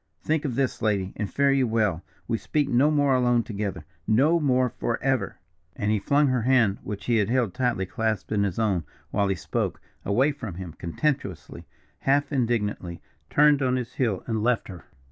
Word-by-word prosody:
Think 155 Hz, -1 st, 0 dB
of 130 Hz, -5 st, -2 dB
this, 135 Hz, -1 st, -1 dB
lady, 100 Hz, -3 st, 0 dB
and 105 Hz, -3 st, -4 dB
fare 140 Hz, 0 st, +3 dB
you 135 Hz, -2 st, +2 dB
well. 105 Hz, -7 st, +1 dB, 0.3 s
We 115 Hz, -, -1 dB
speak 150 Hz, -2 st, 0 dB
no 135 Hz, +3 st, +3 dB
more 145 Hz, -3 st, +3 dB
alone 120 Hz, -2 st, +3 dB
together 100 Hz, -6 st, -4 dB, 0.2 s
no 145 Hz, +10 st, +4 dB
more, 130 Hz, -4 st, +2 dB
forever!" 125 Hz, +2 st, -1 dB, 0.4 s
And 105 Hz, 0 st, -1 dB
he 110 Hz, -, +2 dB
flung 145 Hz, +8 st, +2 dB
her 130 Hz, -2 st, +1 dB
hand, 115 Hz, -5 st, +3 dB
which 100 Hz, -1 st, -6 dB
he 120 Hz, -2 st, +2 dB
had 105 Hz, 0 st, +1 dB
held 120 Hz, -6 st, +1 dB
tightly 125 Hz, -6 st, 0 dB
clasped 110 Hz, +3 st, -2 dB
in 105 Hz, -1 st, +1 dB
his 95 Hz, -3 st, -2 dB
own 100 Hz, -7 st, +1 dB, 0.3 s
while 100 Hz, -1 st, +1 dB
he 95 Hz, -, 0 dB
spoke, -, -, -3 dB, 0.2 s
away 130 Hz, +9 st, +2 dB
from 115 Hz, -, -7 dB
him 90 Hz, -3 st, -7 dB
contemptuously, 100 Hz, -, -3 dB, 0.3 s
half 140 Hz, +2 st, +1 dB
indignantly, 110 Hz, -, -1 dB, 0.3 s
turned 150 Hz, -1 st, +4 dB
on 130 Hz, -1 st, +2 dB
his 125 Hz, -2 st, -4 dB
heel 110 Hz, -8 st, -1 dB
and 110 Hz, -2 st, -1 dB
left 120 Hz, 0 st, 0 dB
her. 90 Hz, -3 st, -10 dB
115 Hz, 185 wpm, -25 LUFS, 100-135 Hz, 0.4 s, no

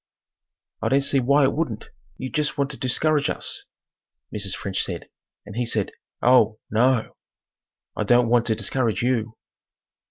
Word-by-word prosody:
"I -, -, 0 dB
don't 135 Hz, +1 st, +3 dB
see 140 Hz, 0 st, +2 dB
why 140 Hz, +3 st, +3 dB
it 135 Hz, -, +3 dB
wouldn't. 130 Hz, -9 st, -3 dB, 0.3 s
You 130 Hz, -, -5 dB
jest 150 Hz, -1 st, -1 dB
want 140 Hz, 0 st, 0 dB
to 135 Hz, -, -9 dB
discourage 145 Hz, +3 st, +1 dB
us," -, -, -1 dB, 0.7 s
Mrs. 100 Hz, -3 st, -1 dB
French 95 Hz, -2 st, -2 dB
said -, -, -5 dB, 0.4 s
and 105 Hz, -, -10 dB
he 120 Hz, -, 0 dB
said, 110 Hz, -4 st, 0 dB, 0.3 s
"Oh, 115 Hz, -3 st, +5 dB
no 120 Hz, +1 st, +2 dB
o! -, -, -36 dB, 0.8 s
I -, -, -1 dB
don't 120 Hz, -1 st, +4 dB
want 120 Hz, 0 st, +3 dB
to 110 Hz, -, +2 dB
discourage 110 Hz, +1 st, 0 dB
you." 115 Hz, -3 st, -1 dB
120 Hz, 160 wpm, -23 LUFS, 110-135 Hz, 0.8 s, Oh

